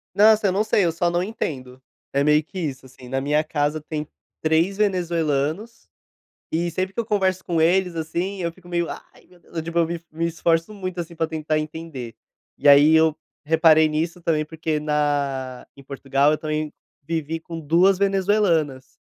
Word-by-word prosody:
Nossa, 215 0 +5
eu - - +2
não 200 +3 +1
sei, 210 -3 +2
eu 170 - +2
só 170 +1 0
não 175 +1 0
entendo, 130 - -5 0.3
é 140 +1 +2
meio 150 +1 +4
que 185 +4 -8
isso, 135 -5 -4
assim, 125 -1 -14
na 135 0 -1
minha 150 +3 +1
casa 150 0 -1
tem 150 -1 -5 0.4
3 165 +5 +2
venezuelanos 175 0 -1 0.6
e 170 +2 0
sempre 185 +3 -2
que 235 - -4
eu 230 - -1
converso 190 -3 +1
com 165 -2 0
eles, 180 +1 +2
assim, 175 +4 -3
eu 170 -1 -1
fico 175 +1 -19
meio, 170 -1 -1
"Ai, - - -11
meu 180 - -21
Deus!", 170 - -21
eu 165 - -1
tipo 170 +1 -4
eu 165 - +3
me 170 -1 -4
me 165 +2 -2
esforço 165 +3 0
muito, 185 -3 -5
assim, 170 0 -6
para 160 0 -1
tentar 155 -1 -2
entender, 155 -6 -6 0.4
e - - 0
aí 145 +2 +8
eu 160 -1 +4 0.3
reparei 160 0 +5
nisso 165 +3 -2
também 155 -2 +1
porque 160 0 -3
na 145 -4 -1
em 140 - -12
Portugal 140 +1 +1
eu 155 - +1
também 155 -1 -3 0.3
vivi 165 -1 -2
com 165 0 -8
2 170 +5 +3
venezuelanas 190 -8 +1
160 Hz, 190 wpm, -23 LUFS, 150-175 Hz, 0.6 s, aí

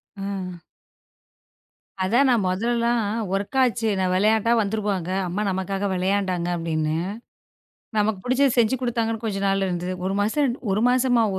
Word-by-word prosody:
அ. 190 -3 -5 1.4
அதான் 240 +8 +3
நான் 230 -6 +2
மொதல்ல 220 +6 0
எல்லாம் 235 0 +1 0.3
வொர்க் 200 +7 -2
ஆச்சு. 235 -2 0
நான் 185 -1 +1
விளையாட்டா 220 +3 +3
வந்துருப்பாங்க 200 -4 -2 0.2
அம்மா 185 +4 -2
நமக்காக 195 +2 -2
விளையாண்டாங்க 185 -1 0
அப்படின்னு. 155 -2 -1 1.0
நமக்குப் 210 -2 0
புடிச்சது 260 +1 +2
செஞ்சு 230 +2 +3
கொடுத்தாங்கன்னு 230 -2 -1
கொஞ்சம் 200 -2 -1
நாள் 195 0 +1
இருந்தது. 180 +1 -2
ஒரு 195 - 0
மாசம், 245 +4 +1 0.2
ஒரு 205 +3 +1
மாசமா 250 -2 +3
205 Hz, 130 wpm, -23 LUFS, 185-235 Hz, 1.4 s, அதான்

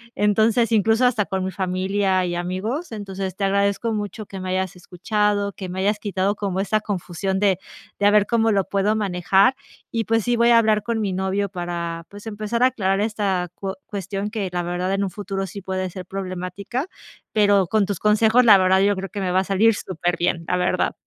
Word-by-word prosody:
Entonces, 220 +3 +2
incluso 225 +3 +3
hasta 225 -5 +2
con 190 -1 -2
mi 190 - -3
familia 190 +1 0
y 175 - -2
amigos. 190 - -3
Entonces 195 -3 -5
te 200 - -4
agradezco 200 +3 +1
mucho 210 0 -4
que 195 -1 -8
me 185 0 -5
hayas 185 0 -1
escuchado, 200 +3 -1
que 185 -1 -7
me 185 +1 -5
hayas 205 +2 +1
quitado 200 0 -1
como 195 -2 -2
esa 205 +2 +1
confusión 190 -1 -3
de, 195 -3 +2 0.4
de 205 - +1
a - - +5
ver 210 -1 +5
cómo 225 0 +2
lo 200 -2 +2
puedo 200 +2 +1
manejar 195 +4 +2 0.4
y, 225 -1 -1
pues 225 -1 +1
sí, 245 +2 +1
voy 235 +1 +4
a 235 - +7
hablar 215 -2 +3
con 225 +1 -2
mi 200 -3 -1
novio 190 +2 -1
para, 170 -2 -4
pues 205 +1 -12
empezar 220 +2 -2
a - - +7
aclarar 195 -6 0
esta 200 -5 -1
cuo 195 -1 -5
cuestión 200 0 -4
que 205 -4 -3
la 175 0 -2
verdad 175 +2 -2
en 195 +1 0
un 195 - -1
futuro 195 0 -4
sí 200 +3 -8
puede 185 0 -3
ser 180 +1 -8
problemática, 190 - -4 0.4
pero 205 -3 +3
con 215 +2 +2
tus 200 -3 -3
consejos 220 +3 +4
la 210 -4 +9
verdad 190 0 +4
yo 200 +1 +3
creo 195 0 -5
que 205 - -5
me 185 -1 -1
va 185 - +3
a - - +1
salir 200 +4 +3
superbién, 175 -2 -1
la 180 - +1
verdad. 180 0 0
195 Hz, 210 wpm, -22 LUFS, 185-210 Hz, 0.4 s, la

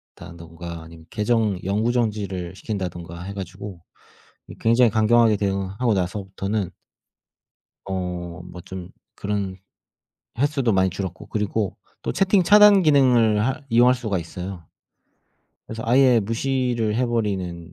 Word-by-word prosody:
다든가 85 0 -9
아니면 80 0 -14
계정 105 -3 0
영구 105 +5 +1
정지를 100 -7 -2
시킨다든가 90 -4 -5
해 100 +2 -6
가지고 95 -1 -8 0.8
굉장히 115 +2 +4
이 - - -2
강경하게 110 0 +4
대응하고 100 +3 -1
나서부터는 95 +1 -2 1.2
어 90 -2 -4
뭐 90 0 -10
좀 95 -1 -8 0.3
그런 100 -2 -3 0.8
횟수도 135 -3 +1
많이 95 -1 +3
줄었고 90 0 -6
그리고 105 -1 -2 0.3
또 - - -2
채팅 195 0 +3
차단 205 +1 +7
기능을 125 -8 +4
할 135 +3 -3
이용할 120 +2 +5
수가 110 -6 -2
있어요. 90 +1 -7 1.0
그래서 115 0 -6
아예 125 0 +5
무시를 120 0 -1
해 125 +2 +1
버리는 95 -7 -2
105 Hz, 285 characters per minute, -23 LUFS, 90-120 Hz, 1.2 s, 차단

